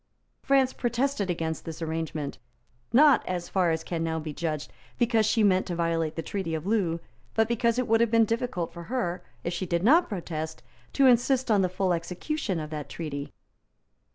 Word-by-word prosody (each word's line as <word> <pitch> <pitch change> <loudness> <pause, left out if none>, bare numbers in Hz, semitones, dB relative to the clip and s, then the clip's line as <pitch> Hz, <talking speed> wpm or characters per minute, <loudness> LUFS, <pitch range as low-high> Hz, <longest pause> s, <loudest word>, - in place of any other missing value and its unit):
France 270 -1 +3
protested 240 -3 -1
against 160 -2 -2
this 160 -1 -7
arrangement, 160 -3 -3 0.5
not, 285 +2 +6
as 175 -1 -3
far 185 -3 +2
as 160 0 -1
can 165 -1 -3
now 160 0 -1
be 155 -1 -5
judged, 155 -2 -3 0.2
because 230 -3 +3
she 220 0 +3
meant 190 -2 +3
to 175 - -2
violate 165 -2 0
the 165 - -3
Treaty 185 -4 -3
of 160 - -5
Loo, 190 -6 +1 0.4
but 225 0 +3
because 235 0 +1
it 250 - 0
would 225 +1 +4
have 235 - +3
been 230 0 +5
difficult 225 -6 -2
for 170 0 -8
her, 205 -7 -2 0.2
if 170 - -2
she 180 +2 -3
did 170 +1 0
not 320 - +5
protest, 160 -5 -5 0.3
to 275 - +4
insist 250 0 +4
on 205 -2 +4
the 185 - +1
full 185 0 0
execution 180 - -2
of 155 0 -6
that 150 -2 -5
treaty. 145 -4 -5
180 Hz, 190 wpm, -27 LUFS, 165-230 Hz, 0.5 s, not